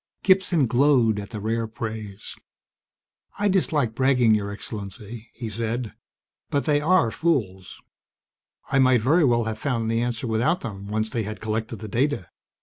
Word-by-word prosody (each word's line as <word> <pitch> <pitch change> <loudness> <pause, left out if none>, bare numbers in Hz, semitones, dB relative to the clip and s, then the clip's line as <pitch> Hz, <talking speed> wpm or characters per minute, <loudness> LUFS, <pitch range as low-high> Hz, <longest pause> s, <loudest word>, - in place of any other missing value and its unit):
Gibson 185 -6 +3
glowed 120 -3 +3
at 100 - -7
the 110 - -6
rare 115 +2 -1
praise. 110 -2 -6 1.0
"I 205 - +1
dislike 160 - +1
bragging, 125 -2 +3
Your 100 -1 0
Excellency," 105 +2 -8
he 115 -1 -7
said, 115 +1 -3 0.6
"but 140 - 0
they 145 -1 +2
are 165 -7 +3
fools. 105 - -1 0.9
I 135 - +3
might 130 -3 +4
very 155 +9 +3
well 120 -4 +3
have 110 -1 -4
found 115 -5 -1
the 115 0 +1
answer 120 +1 -2
without 120 +10 +1
them, 100 -3 -7
once 110 +1 -2
they 115 - -1
had 110 0 -5
collected 110 +1 -3
the 110 0 -8
data. 120 - -1
115 Hz, 155 wpm, -24 LUFS, 110-135 Hz, 1.0 s, might